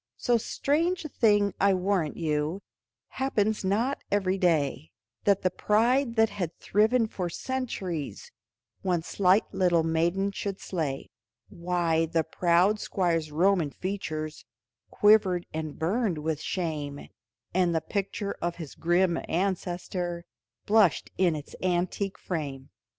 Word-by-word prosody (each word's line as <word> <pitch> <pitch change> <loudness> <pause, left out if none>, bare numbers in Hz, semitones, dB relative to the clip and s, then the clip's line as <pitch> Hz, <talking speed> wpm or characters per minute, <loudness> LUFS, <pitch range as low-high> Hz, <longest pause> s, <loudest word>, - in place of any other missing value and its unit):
So 245 - +2
strange 330 +9 0
a - - -4
thing 205 -5 +3
I 195 -1 +5
warrant 185 -4 0
you 155 +3 -1 0.5
Happens 220 -6 0
not 225 +9 0
every 195 -1 +1
day, 150 - +1 0.4
That 200 -1 +3
the 185 - +2
pride 235 +6 +2
that 225 -2 +3
had 180 -5 -4
thriven 220 +4 +2
for 185 -5 -4
centuries 235 - -4 0.5
One 180 -3 0
slight 190 +3 +3
little 180 -3 +3
maiden 170 +5 +1
should 200 0 -4
slay; 155 -7 -3 0.4
Why 170 -2 0
the 165 0 +1
proud 175 +5 +2
Squire's 165 -6 0
Roman 175 0 +2
features 155 -3 -4 0.5
Quivered 205 -4 +4
and 155 -1 -4
burned 190 +2 0
with 155 0 -2
shame, 150 -5 -3 0.5
And 175 -2 +2
the - - +3
picture 200 +2 -3
of 170 0 -1
his 160 -5 -8
grim 175 0 +2
ancestor 175 -1 -2 0.4
Blushed 210 -5 +3
in 175 -4 +3
its 150 -1 -8
antique 185 +2 -1
frame. 140 -6 -5
185 Hz, 125 wpm, -27 LUFS, 165-205 Hz, 0.5 s, I